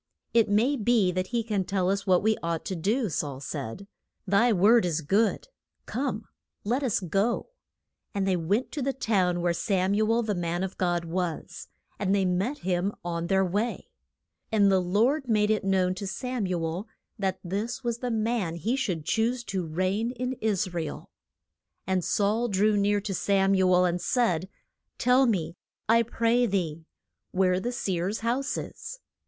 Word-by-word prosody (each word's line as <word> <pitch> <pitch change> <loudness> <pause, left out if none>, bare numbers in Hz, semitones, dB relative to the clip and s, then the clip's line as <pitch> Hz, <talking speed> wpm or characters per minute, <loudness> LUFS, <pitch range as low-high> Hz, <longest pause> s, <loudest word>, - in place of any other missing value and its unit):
It 230 -3 +4
may 230 +8 +3
be 220 -4 +3
that 185 +1 -2
he 235 +1 -1
can 210 -4 -1
tell 185 -1 -1
us 200 +1 -1
what 185 0 +4
we 220 0 +3
ought 165 -1 -2
to 190 - -3
do 215 +8 0
Saul 145 -5 -3
said, 140 - -6 0.4
Thy 205 +5 +3
word 220 +4 +5
is 165 -2 0
good; 200 +9 +1 0.4
come, 245 -5 -3 0.4
let 245 +7 0
us 255 -6 +1
go. 195 - 0 0.6
And 195 -1 -1
they 190 - +2
went 195 +9 0
to 295 - -4
the 270 +1 0
town 185 -8 +1
where 175 0 +1
Sam 190 +1 0
u 215 +2 +2
el, 235 +1 +2
the 215 -2 -1
man 175 0 -2
of 190 0 -4
God, 175 -2 0
was. 170 -1 -4 0.3
And 200 -1 +1
they 195 -1 +2
met 190 +10 0
him 185 +2 0
on 170 -1 -2
their 190 +1 +3
way. 205 +4 -2 0.6
And 205 -3 +4
the 190 - +4
Lord 235 - +1
made 210 -1 +3
it 215 - +1
known 190 -1 +2
to 195 +2 -6
Sam 250 0 -3
u 175 -3 -1
el 175 +7 -4 0.3
that 190 -2 -1
this 210 +8 -3
was 235 -1 -2
the 250 - -2
man 220 -6 -1
he 220 +9 -1
should 185 - -2
choose 235 +5 0
to 195 -4 -3
reign 185 +8 0
in 255 0 -3
Is 195 -4 0
ra 170 - -1
el. 160 - -7 0.7
And 185 -1 0
Saul 215 +6 +1
drew 210 0 +2
near 205 0 +2
to 200 -1 -4
Sam 195 +1 +2
u 190 -1 +3
el, 180 0 +5
and 175 0 0
said, 190 -8 +1 0.5
Tell 250 +1 +4
me, 170 -6 -1 0.3
I 230 +1 +5
pray 235 +1 +1
thee, 165 -5 -2 0.4
where 185 -1 +2
the 240 +5 -2
seer's 195 -4 -2
house 250 +5 -1
is. - - -7
200 Hz, 180 wpm, -27 LUFS, 180-230 Hz, 0.7 s, word